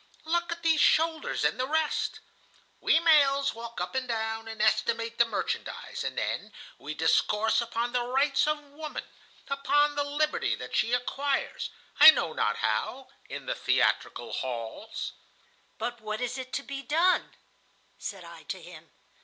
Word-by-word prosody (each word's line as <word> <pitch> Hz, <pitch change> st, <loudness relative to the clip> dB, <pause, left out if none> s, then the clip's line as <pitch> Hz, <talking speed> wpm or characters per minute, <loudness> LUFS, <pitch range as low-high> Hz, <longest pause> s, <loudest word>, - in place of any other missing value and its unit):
Look 345 Hz, +2 st, 0 dB
at 340 Hz, 0 st, -5 dB
these 320 Hz, -2 st, +4 dB
shoulders 320 Hz, 0 st, +2 dB
and -, -, +1 dB
the 255 Hz, -, 0 dB
rest.' 315 Hz, +1 st, 0 dB, 0.6 s
We 320 Hz, -, +4 dB
males 280 Hz, -4 st, +4 dB
walk 235 Hz, +1 st, -8 dB
up -, -, -3 dB
and 260 Hz, -1 st, -1 dB
down, 225 Hz, -1 st, -2 dB
and 225 Hz, -1 st, -7 dB
estimate 230 Hz, +2 st, +1 dB
the 235 Hz, -, +7 dB
merchandise, 230 Hz, -, -4 dB
and -, -, -4 dB
then -, -, -2 dB, 0.3 s
we -, -, -6 dB
discourse 220 Hz, +3 st, +2 dB
upon 235 Hz, +1 st, -2 dB
the 245 Hz, -, +2 dB
rights 275 Hz, +3 st, +2 dB
of 305 Hz, 0 st, +2 dB
woman, 305 Hz, +1 st, -6 dB, 0.4 s
upon 290 Hz, +1 st, +2 dB
the 290 Hz, 0 st, 0 dB
liberty 295 Hz, +2 st, 0 dB
that -, -, -7 dB
she 225 Hz, -, +2 dB
acquires, 270 Hz, +3 st, -1 dB, 0.3 s
I -, -, +13 dB
know 165 Hz, -, +3 dB
not 105 Hz, -, +1 dB
how, 110 Hz, -, -1 dB, 0.2 s
in -, -, -6 dB
the -, -, -1 dB
theatrical -, -, 0 dB
halls." 120 Hz, -, -4 dB, 0.7 s
"But 240 Hz, -1 st, -4 dB
what 215 Hz, 0 st, -4 dB
is 250 Hz, +1 st, -2 dB
to 280 Hz, -, -2 dB
be 275 Hz, 0 st, -6 dB
done?" 330 Hz, +7 st, +2 dB, 0.6 s
said 195 Hz, -3 st, -6 dB
I 170 Hz, -1 st, -11 dB
to 190 Hz, -2 st, -5 dB
him. 170 Hz, -2 st, -13 dB
255 Hz, 155 wpm, -28 LUFS, 220-295 Hz, 0.7 s, I